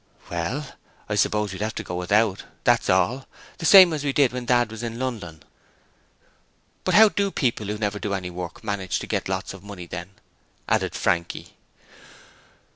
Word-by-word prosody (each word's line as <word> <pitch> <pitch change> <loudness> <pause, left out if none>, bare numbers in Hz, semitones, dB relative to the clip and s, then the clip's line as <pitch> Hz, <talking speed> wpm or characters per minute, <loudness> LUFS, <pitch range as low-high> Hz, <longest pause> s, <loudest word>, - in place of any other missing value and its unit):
'Well, 85 - -2 0.4
I - - -3
suppose 105 -2 +1
we'd 95 - -7
have 110 +1 -2
to - - -4
go - - -7
without, 100 +3 +1 0.2
that's - - +3
all, 105 +9 +2 0.3
the 165 - 0
same 185 -4 +9
as 150 -2 -3
we 145 - 0
did 135 -3 +3
when 125 -1 -4
Dad 120 -2 +3
was 110 0 -7
in 115 -1 -4
London.' 110 -11 -5 1.4
'But - - +1
how 220 0 +8
do 200 0 0
the 195 - -2
people 115 - -1
who 105 +1 -3
never 105 -1 -2
do 100 -1 -2
any 90 -2 -5
work 90 -1 -7
manage 100 -3 -2
to - - -5
get - - -2
lots 95 0 -3
of 95 - -11
money 100 -4 -8
then?' 90 +3 -8 0.5
added - - 0
Frankie. 85 0 -1
105 Hz, 185 wpm, -24 LUFS, 95-125 Hz, 1.4 s, same